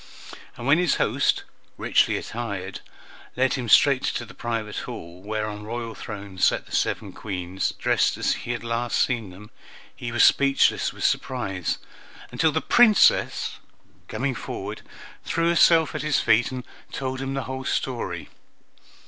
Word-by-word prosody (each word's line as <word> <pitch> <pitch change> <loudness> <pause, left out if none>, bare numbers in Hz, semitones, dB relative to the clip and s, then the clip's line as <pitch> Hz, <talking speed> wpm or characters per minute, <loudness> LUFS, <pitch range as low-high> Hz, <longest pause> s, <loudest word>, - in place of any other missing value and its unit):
And 120 - -7
when 145 +5 +5
his 180 - +2
host, - - +1 0.3
richly - - +2
attired, 100 -5 -5 0.5
led 130 +1 +2
him 125 -4 -3
straight 135 +3 +6
to 120 - -2
the 115 - -13
private 115 -3 -4
hall, 85 +2 -7
where 105 +2 -3
on 105 -1 -6
royal 115 +1 -5
thrones 100 -4 -7
sat - - +3
the - - -5
seven - - -1
Queens, 95 -2 -3
dressed - - +1
as - - +1
he 120 - -5
had 120 - -6
last 115 0 -1
seen 115 -6 0
them, 100 +4 -13 0.4
he 120 - -5
was 120 - +3
speechless 140 -1 +4
with - - -8
surprise, 95 -9 -1 0.5
until - - +2
the - - 0
Princess, 230 -4 +4 0.5
coming 135 +1 -2
forward, 105 -2 -6 0.4
threw 165 0 0
herself 165 -4 +5
at - - -3
his 150 -2 +1
feet 120 +5 +3
and 130 -1 -5 0.3
told 130 -1 -3
him 135 0 -3
the 135 - -2
whole 130 0 -5
story. 115 -11 -3
120 Hz, 155 wpm, -24 LUFS, 105-135 Hz, 0.5 s, straight